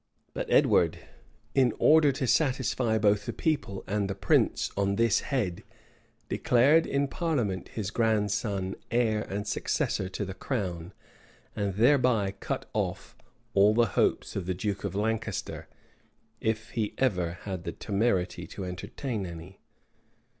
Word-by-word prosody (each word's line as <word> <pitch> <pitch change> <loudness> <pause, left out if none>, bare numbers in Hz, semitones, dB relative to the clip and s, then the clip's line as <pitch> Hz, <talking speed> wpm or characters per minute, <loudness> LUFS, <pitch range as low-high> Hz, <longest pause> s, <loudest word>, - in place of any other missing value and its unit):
But - - -4
Edward, 85 0 +4 0.6
in 130 -4 +3
order 155 -2 +5
to 130 0 -2
satisfy 130 -4 +1
both 105 -1 +2
the - - -2
people 145 - -1
and 100 -1 -1
the 95 - -2
prince - - +2
on 100 0 +1
this 115 0 +3
head, 105 - -2 0.7
declared 140 +7 +4
in 140 0 +1
parliament 130 - -1
his 105 -3 -4
grandson 105 -4 0 0.2
heir 110 -2 +1
and 105 +1 -4
successor 95 -2 -1
to 100 +2 -4
the 95 - -6
crown; 95 -7 -3 0.6
and 100 -2 -2
thereby 120 -4 +3
cut 100 - -5
off - - -3 0.4
all 100 +2 +5
the 120 0 +5
hopes - - +1
of 95 -3 -3
the 95 - -1
duke 100 +2 -3
of - - -3
Lancaster, 110 +2 -2 0.7
if 110 0 -2
he 110 -3 -2
ever 90 -10 +1
had 95 -4 -5
the - - -3
temerity 100 -4 -1
to 95 - -6
entertain 95 +4 -4
any. 85 +3 -10
105 Hz, 140 wpm, -28 LUFS, 95-120 Hz, 0.7 s, order